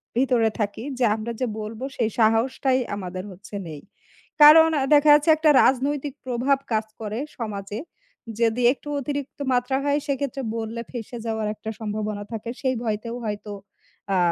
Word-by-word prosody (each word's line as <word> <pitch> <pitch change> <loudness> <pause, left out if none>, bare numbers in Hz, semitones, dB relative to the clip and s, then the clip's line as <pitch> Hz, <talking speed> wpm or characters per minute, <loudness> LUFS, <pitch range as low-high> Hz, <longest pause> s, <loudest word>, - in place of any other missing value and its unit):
ভিতরে 245 -3 +3
থাকি। 210 +2 -2 0.2
যে 245 - +4
আমরা 225 +2 -5
যে - - +2
বলব 215 +3 -7 0.2
সেই 225 -3 +1
সাহসটাই 250 +4 +2 0.2
আমাদের 185 -1 -5
হচ্ছে 195 +3 -11
নেই। 150 -2 -8 0.6
কারণ 320 +2 +9
অ্যা 270 - +1
দেখা 295 +1 +5
যাচ্ছে 295 +2 +4
একটা 310 -1 +3
রাজনৈতিক 275 +2 +1
প্রভাব 255 +3 +1 0.2
কাজ 215 0 +1 0.2
করে 215 +2 -4 0.2
সমাজে। 205 -1 -5 0.6
যদি 230 +1 +2
একটু 295 - -16
অতিরিক্ত 285 0 -5
মাত্রা 250 +2 +1
হয় 285 +1 +2
সেক্ষেত্রে 275 -1 -2 0.2
বললে 225 +1 -4
ফেঁসে 240 0 -6
যাওয়ার 220 -1 -2
একটা 220 +1 -7
সম্ভাবনা 210 -1 -3
থাকে। 225 +1 -5
সেই 260 -2 +1
ভয়তেও 225 +2 -3
হয়তো 210 0 -4 0.6
আ - - +3
235 Hz, 155 wpm, -24 LUFS, 215-270 Hz, 0.6 s, কারণ